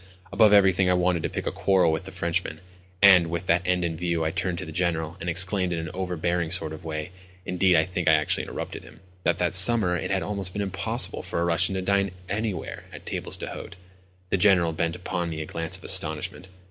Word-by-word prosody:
Above 105 0 +5
everything 95 -2 +4
I 90 - +3
wanted 90 -1 +1
to - - -3
pick - - -5
a - - -1
quarrel 95 -4 +2
with 80 +3 -3
the 95 - -8
Frenchman; 85 -2 -3 0.4
and, 90 -4 +7
with 85 +2 -4
that 85 0 +2
end 90 -1 +1
in 85 -1 -3
view 85 -1 -2
I 80 - -1
turned 90 +1 -2
to - - -4
the 80 - -9
General, 85 -1 -2
and 90 - -4
exclaimed 95 +2 +2
in 85 - -2
an 80 -1 -5
overbearing 90 -2 -2
sort 80 -3 -1
of 80 - -10
way—indeed, 90 +3 -2
I 80 - +4
think 90 -1 -5
that 80 - +6
I - - +3
actually 75 - -1
interrupted - - -6
him—that 90 -1 -5
that 90 -1 -1
summer 95 -1 +7
it - - -4
had 95 -1 0
been - - -5
almost 100 -3 -2
impossible 100 +4 -2
for - - -4
a 85 - 0
Russian 85 +3 +2
to 95 - -3
dine 100 +1 +1 0.2
anywhere 100 -3 -4
at - - -12
tables - - -2
d'hôte. - - -8 0.6
The - - +2
General 90 -4 +3
bent 85 +1 -2
upon 90 -1 -4
me 80 -1 -5
a 80 - -4
glance 80 +1 -3
of - - -20
astonishment. 80 +4 0
90 Hz, 225 wpm, -25 LUFS, 85-95 Hz, 0.6 s, and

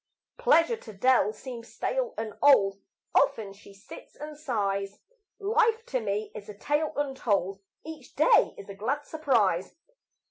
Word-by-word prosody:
Pleasure 465 -2 +4
to 220 - -12
Dell 240 +2 +3
seems 235 0 -9
stale - - -2
and 220 -1 -4
old, 200 -9 +5 0.3
Often 205 -3 +2
she 200 0 -16
sits 195 +1 -13
and 300 0 -8
sighs; 200 -8 -2 0.4
Life 450 +2 +1
to 260 - -1
me 210 -1 -3
is 210 0 -9
a 205 - -9
tale 295 +6 0
untold, 210 -9 -1 0.2
Each 310 -5 -10
day 310 - +4
is 200 - -10
a 200 - -7
glad 260 +9 -3
surprise. 230 - 0
235 Hz, 145 wpm, -27 LUFS, 200-300 Hz, 0.4 s, old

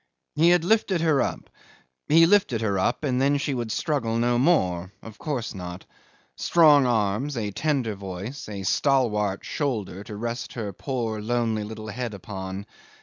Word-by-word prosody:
He 165 +3 +4
had 175 -1 +4
lifted 195 -2 +2
her 155 -5 +3
up. - - -3 0.6
He 165 +2 +6
lifted 180 - +3
her 100 -3 0
up, 125 +9 0
and 130 -3 +1
then 140 +1 +3
she 145 0 -2
would 120 -3 -3
struggle 120 -7 -1
no 120 +1 +2
more. 95 - +2
Of 110 -1 -11
course 135 -7 -3
not. 90 -1 -7 0.5
Strong 150 -6 +5
arms, 115 +4 0
a 105 -3 -2
tender 135 -3 0
voice, 100 +7 -7
a 100 -2 -5
stalwart 105 -4 +1
shoulder 105 - -3
to 105 - -7
rest 115 +3 -4
her 105 -4 -4
poor 115 -1 -3
lonely 115 -1 0
little 110 +1 -7
head 115 0 -4
upon. 95 0 -6
115 Hz, 160 wpm, -25 LUFS, 105-140 Hz, 0.6 s, He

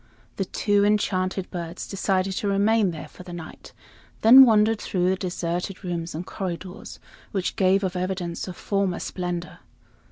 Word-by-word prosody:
The 195 - -1
two 205 +2 +1
enchanted 190 -2 0
birds 170 0 -5
decided 195 -1 0
to 205 - -1
remain 200 +1 +3
there 160 -3 -7
for - - -14
the 180 -1 -10
night; 165 -2 -9 0.5
then 260 +4 +10
wandered 220 -1 +3
through 180 -1 0
the - - +1
deserted 180 +1 -3
rooms 170 -3 -4
and 170 +3 -5
corridors, 185 +2 -6 0.3
which 190 -3 -2
gave 195 +1 +3
of 185 -1 -2
evidence 180 -2 -3
of 180 - -7
former 195 -3 -1
splendor. 175 -1 -5
185 Hz, 155 wpm, -24 LUFS, 175-200 Hz, 0.5 s, then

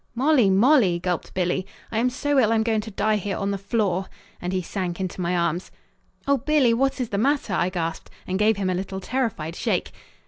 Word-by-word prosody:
"Molly, 260 -4 +4
Molly," 200 - +4
gulped 180 -1 -3
Billy, 185 0 0 0.3
"I 220 - 0
am 250 +2 +2
so 285 +2 +1
ill 225 -3 +3
I'm 225 -1 +3
going 220 -1 +1
to 220 - -8
die 215 +1 +1
here 200 0 -3
on 200 0 -1
the 200 - -1
floor," 195 -2 0 0.3
and 180 - -3
he 185 -1 -1
sank 180 -1 -4
into 185 -1 -4
my 175 +1 0
arms. 170 +1 -1 0.6
"Oh, 280 0 +4
Billy, 280 -3 +3
what 270 +3 +1
is 245 -3 -2
the 200 - -1
matter?" 280 +5 +1
I 175 - +1
gasped 165 -3 -4 0.2
and 190 +1 -2
gave 215 0 +3
him 190 -2 0
a - - 0
little 190 +1 -4
terrified 195 -8 -2
shake. - - -1
200 Hz, 215 wpm, -24 LUFS, 185-235 Hz, 0.6 s, Molly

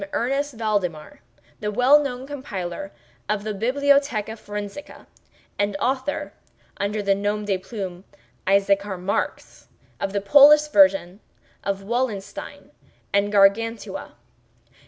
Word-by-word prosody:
Ernest 275 +3 -1
Valdemar, 200 -8 -2 0.4
the 210 - -2
well 255 +7 +5
known 260 -3 -4
compiler 195 -10 -6 0.4
of 210 -1 -1
the 215 0 -3
"Bibliotheca 255 -1 +1
Forensica," 205 +4 -8 0.5
and 205 -1 0
author 260 +5 -2 0.4
(under 205 +1 -2
the 200 0 +3
nom 205 +1 -2
de 200 -2 +1
plume 190 -3 -7 0.4
of 195 - +3
Issachar 200 -1 0
Marx) 115 -10 -4 0.3
of 195 - -2
the 200 - 0
Polish 295 +8 +7
versions 285 -11 +4 0.4
of 195 0 -2
"Wallenstein" 225 -2 -4 0.4
and 200 +1 +2
"Gargantua." 210 +3 +1
210 Hz, 115 wpm, -23 LUFS, 195-260 Hz, 0.5 s, Polish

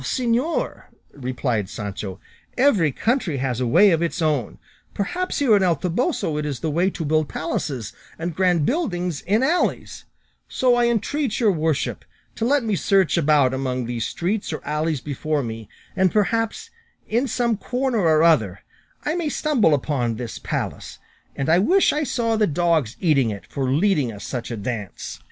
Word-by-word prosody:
"Señor," 245 - -1 0.3
replied 125 -6 -2
Sancho, 100 -2 -6 0.4
"every 220 - +4
country 220 - 0
has 130 -2 -2
a 125 - +1
way 200 - +6
of 165 -1 +2
its 170 +2 -1
own; 150 -9 0 0.4
perhaps 355 - -2
here 255 -7 +4
in 200 - +3
El 180 -3 +3
Toboso 180 - -1
it - - -2
is 145 -4 -4
the 160 - -1
way 175 +5 +2
to 165 -4 -5
build 155 0 +1
palaces 135 -8 -3 0.2
and 170 0 -4
grand 180 -4 +2
buildings 180 - -1
in 215 +6 +1
alleys; 335 +6 0 0.4
so 255 -1 +2
I 240 0 +3
entreat 235 +2 -1
your 220 -4 +4
worship 160 -4 -1 0.3
to 225 - -2
let 280 +1 +2
me 215 -3 0
search 190 +1 +2
about 150 -5 +3
among 130 -2 -2
these 120 -1 -2
streets 195 +4 -2
or 155 - -6
alleys 150 -1 -1
before 150 +1 -2
me, 110 -2 -6 0.3
and 190 -2 +3
perhaps, 225 - 0 0.4
in 240 +5 +1
some 235 -1 0
corner 250 +2 -1
or 160 -4 +4
other, 110 - +3 0.4
I 300 - 0
may 340 -3 -1
stumble 240 - +2
on 120 -6 0
this 115 0 -6
palace - - -4 0.4
and 135 - -2
I 165 +2 +5
wish 370 - +4
I 300 - 0
saw 230 -4 0
the 215 -1 +3
dogs 160 -6 +1
eating 140 -9 +3
it 100 -2 -6
for 135 -2 -3
leading 150 - +2
us 105 -2 -9
such 125 -3 -4
a 120 - -4
dance." 105 -2 -5
165 Hz, 175 wpm, -22 LUFS, 135-225 Hz, 0.4 s, way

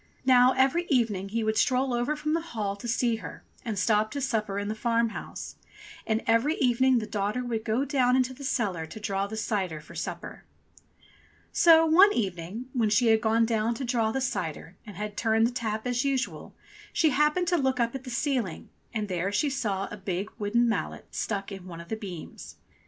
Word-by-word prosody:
Now 255 0 +6
every 275 +7 +2
evening 220 - +1
he 225 +2 -1
would 220 0 +1
stroll 255 0 +2
over 240 +5 0
from 305 +1 -2
the 330 - +1
Hall 215 -11 -3
to 220 +4 -8
see 235 -1 +1
her - - -9 0.2
and 220 -4 -3
stop 215 +2 +2
to 285 - -4
supper 220 -6 -1
in 205 0 -2
the 215 - -1
farm 230 +1 +1
house, - - -8 0.5
and 220 0 0
every 230 +8 +3
evening 260 0 +3
the 220 - -1
daughter 210 +3 -2
would 225 -2 -2
go 230 +5 0
down 255 -3 +2
into 260 0 +1
the 280 - -11
cellar 195 -11 -1
to 220 - -9
draw 200 -1 -1
the 220 +2 -6
cider 190 -7 -2
for 150 - -14
supper. - - -6 1.1
So 325 -1 +6
one 365 +6 +7
evening 190 +2 -3
when 230 -5 +2
she 225 +3 +3
had 220 0 +4
gone 225 0 +3
down 225 0 0
to 265 - -4
draw 230 -3 +1
the 265 - -2
cider 180 - -3
and 210 - -9
had 210 0 -5
turned 225 -1 +2
the 235 - +1
tap 220 -3 -3
as 245 0 0
usual, 270 -2 -2 0.4
she 315 -2 +3
happened 300 +6 +2
to 350 - +3
look 265 -3 0
up 235 -1 +1
at 265 -1 -6
the 260 - -8
ceiling, 240 - -2 0.3
and 215 -1 -1
there 185 +1 -1
she 280 +8 +1
saw 205 -7 -2
a 210 - -6
big 195 +1 -3
wooden 230 +4 +2
mallet 230 - -3
stuck 200 -2 -3
in 190 -2 -8
one 170 -2 -8
of 170 - -11
the 220 - -1
beams. 190 -7 -9
230 Hz, 205 wpm, -27 LUFS, 205-260 Hz, 1.1 s, one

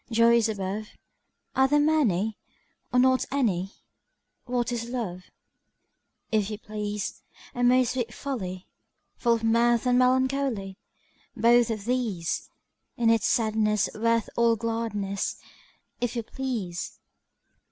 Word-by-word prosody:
Joys 230 -1 +4
above, 205 +1 -3 0.7
Are 265 0 +5
there 295 +2 +3
many, 225 - +2 0.6
or 250 - +1
not 260 +1 +4
any? 195 -9 0 0.7
What 245 -1 -1
is 235 -1 -3
Love? 190 -8 -4 1.1
If 215 -2 +1
you 210 - -4
please, 210 -1 -4 0.3
A 245 - -2
most 250 0 +4
sweet 240 -3 -2
folly! 190 -10 -5 0.5
Full 235 -1 +3
of 230 - -5
mirth 235 +1 +3
and 250 0 +4
melancholy: 255 -6 +1 0.6
Both 235 +1 +5
of 215 -3 -3
these! 230 -9 -1 0.5
In 230 -2 +4
its 225 -1 +2
sadness 215 -2 +2
worth 230 0 +1
all 235 -1 +4
gladness, 220 -3 -2 0.6
If 245 0 -2
you 235 - -2
please! 220 -10 -4
230 Hz, 120 wpm, -27 LUFS, 210-245 Hz, 1.1 s, Are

